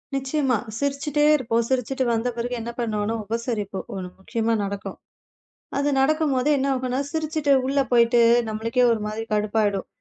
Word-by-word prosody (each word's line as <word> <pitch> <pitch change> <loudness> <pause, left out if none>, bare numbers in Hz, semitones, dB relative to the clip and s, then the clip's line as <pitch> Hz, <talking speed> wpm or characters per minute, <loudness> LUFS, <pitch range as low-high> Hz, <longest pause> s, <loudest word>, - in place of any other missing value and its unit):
நிச்சயமா 270 -2 0 0.2
சிரிச்சுட்டே 285 +2 0
இருப்போம். 235 -4 0
சிரிச்சுட்டு 260 +1 0
வந்த 225 +2 0
பிறகு 240 +1 -3
என்னா 235 +1 -5
பண்ணுவோம்ன்னா, 220 -1 -1
உபசரிப்போம். 220 -3 -3
ஒண்ணு 180 -1 -5
முக்கியமா 230 +2 -1
நடக்கும். 200 0 -5 0.8
அது 285 +1 +1
நடக்கும்போது 290 -1 +2
என்னா 275 +1 0
ஆகும்ன்னா, 255 0 -1
சிரிச்சுட்டு, 310 -2 0
உள்ள 275 +1 +1
போயிட்டு 235 0 +5 0.3
நம்மளுக்கே 230 +3 0
ஒரு 225 - -1
மாதிரி 215 +1 -4
கடுப்பாயிடும். 210 -2 0
240 Hz, 140 wpm, -23 LUFS, 220-275 Hz, 0.8 s, போயிட்டு